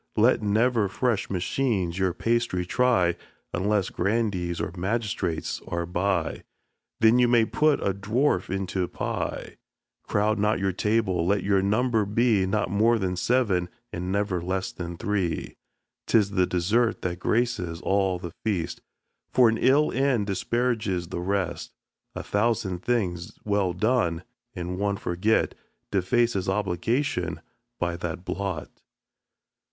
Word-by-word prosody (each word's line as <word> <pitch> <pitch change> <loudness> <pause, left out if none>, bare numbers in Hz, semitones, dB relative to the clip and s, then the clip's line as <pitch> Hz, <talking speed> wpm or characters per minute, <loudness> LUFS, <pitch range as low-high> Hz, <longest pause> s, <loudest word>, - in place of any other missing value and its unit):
Let 115 +3 +4
never 110 +1 +2
fresh 115 +1 -1
machines 95 -1 -1
your 95 -1 +2
pastry 115 -2 0
try, 95 -5 +2 0.4
Unless 100 +1 0
grandees 95 -4 -1
or - - -2
magistrates 95 -3 -2
are 85 0 -2
by, 90 +3 -1 0.6
Then 110 +2 +6
you 125 - +5
may 120 -2 +4
put 150 +4 +2
a 100 - +1
dwarf 105 +1 0
into 95 0 -2
a 90 - 0
pie.[xi - - -3
2] - - -20 0.5
Crowd 105 +1 +1
not 105 +1 +2
your 95 0 0
table; 95 -2 +1
let 100 0 +2
your 100 -1 +3
number 110 +3 +2
be 105 -2 +2
Not 100 -2 0
more 110 +4 +3
than 95 -3 -1
seven, 95 -4 +1 0.2
and 90 +2 -3
never 100 -3 0
less 95 +2 -2
than 85 -1 -6
three. 95 -3 -2 0.5
'Tis 105 -3 +3
the 95 -2 +2
dessert 110 +7 +1
that 90 -1 -2
graces 105 -8 0
all 95 -2 +1
the 85 -1 -7
feast, 100 -7 -2 0.5
For 125 -3 +5
an 110 - -1
ill 145 +4 +4
end 130 -5 +1
disparages 105 -3 -1
the 85 - -4
rest. 90 -3 -2 0.4
A - - -4
thousand 105 -4 0
things 90 -8 -1
well 100 -3 +1
done, 90 -4 +1 0.3
and 90 +1 -4
one 100 -1 0
forgot, 95 +6 +1 0.4
Defaces 100 0 +1
obligation 95 - -1 0.4
by 85 -1 -1
that 90 +1 -5
blot. 95 -6 -3
100 Hz, 135 wpm, -26 LUFS, 90-115 Hz, 0.6 s, Then